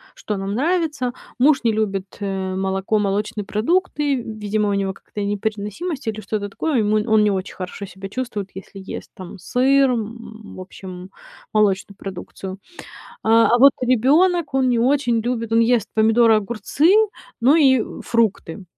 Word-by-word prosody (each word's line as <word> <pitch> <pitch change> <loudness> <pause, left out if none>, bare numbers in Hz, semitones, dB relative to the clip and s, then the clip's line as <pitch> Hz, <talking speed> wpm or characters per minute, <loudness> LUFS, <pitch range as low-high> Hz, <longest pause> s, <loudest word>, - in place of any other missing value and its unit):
что 210 - -4
нам 195 +1 -4
нравится. 300 -4 0 0.3
Муж 275 +1 +4
не 230 - +3
любит, 200 -3 -2
э, 190 -2 -3
молоко, 195 +2 0
молочные 205 +1 -2
продукты. 295 - 0
Видимо, 215 -3 -2
у - - 0
него 195 -1 0
какая-то 205 - -9
непереносимость 215 - -3
или 215 -1 -2
что-то 205 -1 -4
такое. 285 +4 -1
Ему 215 0 +2
он 215 -1 +5
не 210 - +3
очень 190 0 -4
хорошо 185 +2 -6
себя 190 +1 -9
чувствует, 215 -5 -4
если 195 +1 -10
ест, 190 - -8
там, 185 +1 -9
сыр, 265 +6 +3
м, 225 -1 -6
в - - -8
общем, 185 0 -10 0.4
молочную 200 -2 +1
продукцию. 190 0 -8 0.6
А 225 +1 +5
а 240 - +3
вот 275 +2 +8
ребенок- 290 +7 +3
он 260 -1 +2
не 240 -2 +2
очень 245 -2 +2
любит 230 -1 -3
он 230 - +4
ест 230 -2 +2
помидоры, 225 +1 +4
огурцы, 235 - +1 0.5
ну 265 +6 +5
и 265 -7 +5 0.2
фрукты. 205 -6 -1
220 Hz, 155 wpm, -21 LUFS, 200-250 Hz, 0.6 s, вот